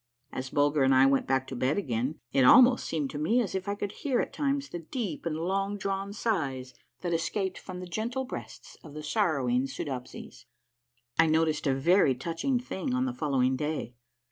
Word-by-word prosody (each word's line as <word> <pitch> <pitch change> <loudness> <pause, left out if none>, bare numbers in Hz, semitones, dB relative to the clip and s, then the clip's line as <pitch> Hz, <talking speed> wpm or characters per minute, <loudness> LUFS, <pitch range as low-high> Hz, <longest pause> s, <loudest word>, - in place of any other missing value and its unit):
As 130 0 -5
Bulger 145 +1 +2
and 135 0 +4
I 130 +1 +6
went 135 0 +2
back 130 0 +1
to 130 - -7
bed 130 +6 0
again, 130 - -2
it 135 - +4
almost 245 - +7
seemed 150 -4 -2
to 145 - -5
me 220 +11 +2
as 225 -6 -1
if 190 +1 -3
I 200 - -1
could 205 -1 -4
hear 265 -4 -1
at - - -2
times 280 -1 -1
the 175 - -5
deep 195 - -4
and 155 -2 -2
long 195 +4 -1
drawn 195 0 -3
sighs 140 - -2 0.3
that 175 -2 -2
escaped 185 +3 -1
from 185 -1 -8
the 180 - -6
gentle 230 +9 -3
breasts 255 - -9
of 150 -3 -12
the 155 - -6
sorrowing 140 - +1
Soodopsies. 130 -1 -7 0.7
I 160 - +6
noticed 155 -1 +1
a 135 - +2
very 145 0 +4
touching 165 - -1
thing 250 +1 -3
on 255 0 +1
the 260 - -2
following 135 - +1
day. 150 -4 -3
165 Hz, 195 wpm, -29 LUFS, 135-205 Hz, 0.7 s, almost